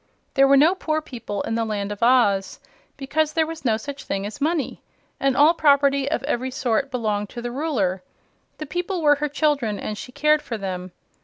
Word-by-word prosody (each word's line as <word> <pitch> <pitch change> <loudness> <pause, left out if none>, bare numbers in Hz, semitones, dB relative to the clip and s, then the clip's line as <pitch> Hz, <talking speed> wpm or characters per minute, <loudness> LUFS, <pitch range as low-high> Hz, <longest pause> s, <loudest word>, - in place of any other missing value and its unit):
There 275 -1 +5
were 275 0 +6
no 310 +6 +5
poor 315 -5 -1
people 245 -9 -6
in 225 - -3
the 230 0 0
Land 210 -2 -3
of 205 - -7
Oz, 220 -6 +3 0.4
because 300 +3 -1
there 320 0 +2
was 325 0 -8
no 225 -4 +2
such 280 +3 -7
thing 195 0 -3
as 215 +7 -7
money, 310 -1 -1 0.4
and 270 -1 +1
all 300 +4 +6
property 280 -3 +3
of 280 -5 -1
every 260 -2 -1
sort 255 0 -1
belonged 210 -5 -2
to 240 - -7
the 240 - -3
Ruler. 240 - -1 0.6
The 305 - -5
people 350 +3 -3
were 290 -1 +5
her 300 - 0
children, 285 -8 0
and 215 - -4
she 250 - -9
cared 300 +3 +2
for 245 -6 -5
them. 185 -2 -5
270 Hz, 205 wpm, -23 LUFS, 220-300 Hz, 0.6 s, were